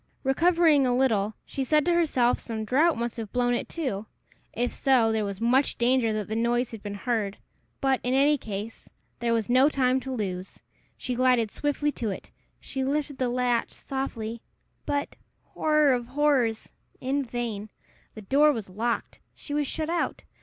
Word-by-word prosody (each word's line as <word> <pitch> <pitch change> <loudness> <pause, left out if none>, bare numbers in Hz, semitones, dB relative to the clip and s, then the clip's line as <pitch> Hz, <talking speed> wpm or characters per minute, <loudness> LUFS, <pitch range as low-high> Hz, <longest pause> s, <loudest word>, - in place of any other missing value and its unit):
Recovering 310 0 +4
a 245 - +2
little, 220 -5 +1
she 275 - -3
said 300 +2 +2
to 350 - +3
herself 280 -8 +2
some 220 -2 -5
draught 300 +7 +3
must 235 0 -3
have 220 -3 -5
blown 245 -1 +1
it 240 - -2
to. 225 -11 -3 0.4
If 245 +2 -2
so, 250 -5 +3
there 220 -1 0
was 200 -1 -4
much 250 +5 +2
danger 240 -1 +2
that 215 -2 -2
the 220 - -3
noise 240 +2 +1
had 225 -3 -8
been 205 -1 -5
heard; 210 -2 -2 0.4
but, 270 -1 +2
in 250 +2 0
any 285 +2 +5
case, 215 -3 -7 0.3
there 235 -1 0
was 225 -2 +1
no 255 +4 +5
time 260 -2 +2
to 265 0 -6
lose. 190 -6 -4 0.4
She 250 - -3
glided 245 -3 +2
swiftly 290 0 -1
to 230 -6 -3
it. 195 - -7 0.3
She 265 -1 -4
lifted 285 0 -2
the 255 -1 +1
latch 245 -1 0
softly 235 -4 -4 0.5
but, 285 0 -2 0.3
horror 305 -3 +2
of 240 -1 -2
horrors! 265 -5 +1 0.3
in 275 +2 -1
vain. 230 -4 -4 0.5
The 215 - -9
door 290 +8 +4
was 220 -8 -5
locked. 230 +5 -2 0.2
She 290 - -8
was 295 -1 0
shut 310 +3 -2
out. 340 -1 -1
250 Hz, 175 wpm, -27 LUFS, 225-275 Hz, 0.5 s, any